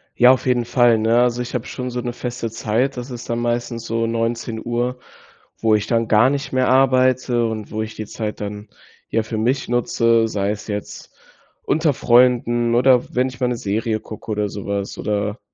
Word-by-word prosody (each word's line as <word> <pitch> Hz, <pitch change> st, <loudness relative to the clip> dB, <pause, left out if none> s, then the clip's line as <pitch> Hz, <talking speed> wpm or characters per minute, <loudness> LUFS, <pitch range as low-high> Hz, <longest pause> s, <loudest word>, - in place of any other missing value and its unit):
Ja, 125 Hz, +1 st, +7 dB
auf 130 Hz, -, +1 dB
jeden 125 Hz, -2 st, +1 dB
Fall, 120 Hz, -1 st, +4 dB
ne, 115 Hz, +2 st, +3 dB
also, 125 Hz, 0 st, +1 dB
ich 125 Hz, -, -6 dB
habe 125 Hz, -1 st, -2 dB
schon 125 Hz, 0 st, -5 dB
so 125 Hz, 0 st, -3 dB
'ne 120 Hz, 0 st, -4 dB
feste 120 Hz, -1 st, -4 dB
Zeit. 115 Hz, +5 st, -1 dB
Das 125 Hz, +1 st, -6 dB
ist 120 Hz, -1 st, -8 dB
dann 115 Hz, 0 st, -1 dB
meistens 120 Hz, -1 st, -2 dB
so 115 Hz, 0 st, -1 dB
19:00, 120 Hz, +2 st, -2 dB, 0.6 s
wo 110 Hz, -1 st, +3 dB
ich 105 Hz, 0 st, -1 dB
dann 115 Hz, -1 st, +1 dB
gar 110 Hz, +4 st, +5 dB
nicht 140 Hz, +1 st, -3 dB
mehr 130 Hz, -1 st, +1 dB
arbeite 130 Hz, -2 st, +3 dB
und 110 Hz, -2 st, -4 dB
wo 110 Hz, -, -2 dB
ich 110 Hz, 0 st, -6 dB
die 110 Hz, -, -5 dB
Zeit 105 Hz, 0 st, -5 dB
dann, 105 Hz, +1 st, -6 dB, 0.4 s
ja, 115 Hz, -, 0 dB
für 115 Hz, 0 st, -5 dB
mich 125 Hz, +5 st, 0 dB
nutze, 115 Hz, -1 st, +2 dB
sei 100 Hz, -2 st, -1 dB
es 105 Hz, 0 st, -6 dB
jetzt 105 Hz, -1 st, -6 dB, 0.5 s
unter 155 Hz, -1 st, +1 dB
Freunden 120 Hz, -1 st, +3 dB
oder 125 Hz, 0 st, +3 dB
wenn 125 Hz, +1 st, +2 dB
ich 130 Hz, -1 st, -12 dB
mal 125 Hz, -, +1 dB
'ne 125 Hz, -, -1 dB
Serie 110 Hz, +2 st, -1 dB
gucke 110 Hz, 0 st, -8 dB
oder 105 Hz, -1 st, -1 dB
sowas, 100 Hz, 0 st, -4 dB
oder, 105 Hz, +2 st, -2 dB
120 Hz, 195 wpm, -20 LUFS, 110-125 Hz, 0.6 s, Ja